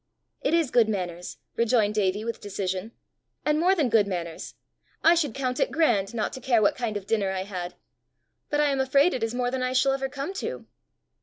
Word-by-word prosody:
"It 330 - +2
is 325 -6 +1
good 230 -3 +4
manners!" 180 -4 -4 0.2
rejoined 230 -3 +2
Davie 205 0 0
with 230 -1 -4
decision, 195 0 -3 0.3
" - - -48
and 300 0 +2
more 365 +4 +4
than 305 -7 +2
good 220 -3 +3
manners! 170 -4 -5 0.5
I 335 - +7
should 300 -8 0
count 255 -2 -2
it - - +1
grand 235 -10 +2
not 220 - -1
to 260 - -7
care 245 -2 +3
what 205 - +3
kind 230 -4 -2
of 200 - -8
dinner 205 -2 0
I 190 -1 -2
had. 180 -3 -6 0.7
But 295 0 +1
I 295 -1 +3
am 270 - -1
afraid 275 +5 +3
it 255 - -3
is 225 +1 -1
more 245 0 0
than 260 0 -2
I 255 0 0
shall 260 +1 +3
ever 270 0 -2
come 280 +6 -5
to!" - - -5
235 Hz, 220 wpm, -26 LUFS, 200-270 Hz, 0.7 s, I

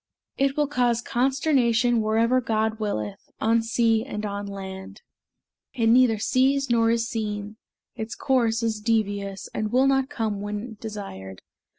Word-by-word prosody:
It 275 +1 0
will 295 - +3
cause 245 -4 +1
consternation 245 -2 +2
Wherever 230 +4 +2
God 220 -2 -1
willeth. 110 - -4
On 225 +1 +3
sea 225 -1 +2
and 215 -5 -5
on 200 0 -4
land 190 -1 -8 0.7
It 230 - +1
neither 240 -2 +5
sees, 265 +4 +1
nor 230 -1 +3
is 230 0 +1
seen. 210 -2 -4 0.4
Its 220 -1 -5
course 235 -4 +1
is 220 -2 -1
devious, 205 -3 -1
And 215 0 -2
will 255 +2 +4
not 270 -1 +2
come 215 -3 -2
when 210 +2 -5
desired. 145 - -7
225 Hz, 145 wpm, -25 LUFS, 210-245 Hz, 0.7 s, neither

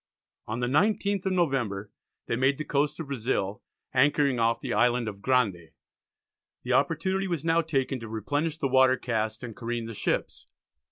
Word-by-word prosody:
On 110 +3 -3
the - - +1
19th 200 - +1
of 190 - +1
November 125 - 0 0.3
they - - -1
made 130 +3 +2
the 155 - -4
coast 145 +2 0
of 160 - -4
Brazil, 115 -7 -2 0.3
anchoring 140 -1 +3
off 115 0 +2
the - - -3
Island 120 +2 +2
of 100 -2 -6
Grande. 100 - +1 0.9
The - - -1
opportunity 190 +4 +1
was 170 -4 -3
now 165 0 +3
taken 135 -4 -1
to 115 -1 -8
replenish 145 +9 -2
the 140 - 0
water 130 0 +4
casks, 110 -1 -2
and 115 -3 -7
careen 120 0 -3
the 115 - -6
ships. - - -2
130 Hz, 170 wpm, -27 LUFS, 115-150 Hz, 0.9 s, water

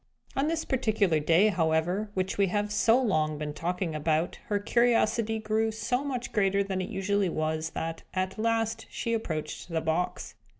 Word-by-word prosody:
On 275 +2 +1
this 320 0 -1
particular 215 -10 +2
day, 165 +7 +4
however, 175 +3 +1
which 185 0 -1
we 200 -1 +3
have 205 +2 -1
so 225 +3 +4
long 155 - +1
been 150 0 -4
talking 175 +1 -2
about 155 +2 0
her 205 - +1
curiosity 225 0 +2
grew 220 +1 0
so 245 +4 -1
much 255 -4 -4
greater 200 -1 +2
than 190 -1 -2
it 185 - -4
usually 200 -1 0
was, 155 0 -1
that, 165 0 -3
at 185 +2 -2
last, 225 0 0
she 230 - -2
approached 170 -7 -3
the 165 -1 0
box. 160 +3 -2
200 Hz, 170 wpm, -28 LUFS, 165-225 Hz, -, day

